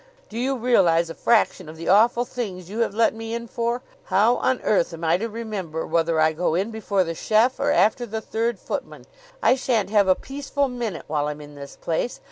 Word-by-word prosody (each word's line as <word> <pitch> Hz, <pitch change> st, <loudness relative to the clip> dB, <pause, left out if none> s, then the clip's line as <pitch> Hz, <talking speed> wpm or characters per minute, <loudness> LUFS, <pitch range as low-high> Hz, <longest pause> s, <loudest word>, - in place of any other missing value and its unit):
"Do 225 Hz, -, -5 dB
you 265 Hz, +2 st, 0 dB
realize 175 Hz, -9 st, +3 dB
a -, -, -6 dB
fraction 195 Hz, -7 st, +1 dB
of 160 Hz, -, -10 dB
the 165 Hz, -, -7 dB
awful 235 Hz, +5 st, +4 dB
things 195 Hz, -8 st, -6 dB
you 220 Hz, -, -4 dB
have 225 Hz, -3 st, 0 dB
let 230 Hz, 0 st, +3 dB
me 225 Hz, +1 st, -5 dB
in 235 Hz, 0 st, -5 dB
for? 235 Hz, +2 st, -2 dB, 0.2 s
How 210 Hz, +6 st, +3 dB
on 260 Hz, -1 st, +1 dB
earth 175 Hz, -4 st, +1 dB
am 165 Hz, -, -10 dB
I 165 Hz, +1 st, +3 dB
to 225 Hz, +4 st, -3 dB
remember 210 Hz, -8 st, -5 dB
whether 165 Hz, 0 st, +1 dB
I 155 Hz, 0 st, +4 dB
go 160 Hz, 0 st, 0 dB
in 195 Hz, +6 st, -1 dB
before 205 Hz, -3 st, 0 dB
the 165 Hz, -1 st, -4 dB
chef 220 Hz, +8 st, +2 dB
or 280 Hz, -, +1 dB
after 240 Hz, -3 st, +2 dB
the 220 Hz, +1 st, -3 dB
third 225 Hz, +1 st, -2 dB
footman? -, -, -6 dB, 0.4 s
I -, -, +6 dB
shan't 235 Hz, -6 st, 0 dB
have 205 Hz, -2 st, +4 dB
a 185 Hz, -, +5 dB
peaceful 280 Hz, +2 st, -3 dB
minute 235 Hz, -8 st, -4 dB
while 150 Hz, -1 st, -1 dB
I'm 150 Hz, 0 st, -5 dB
in 145 Hz, 0 st, -11 dB
this 140 Hz, -1 st, -10 dB
place. 170 Hz, +9 st, -2 dB
215 Hz, 220 wpm, -23 LUFS, 170-235 Hz, 0.4 s, I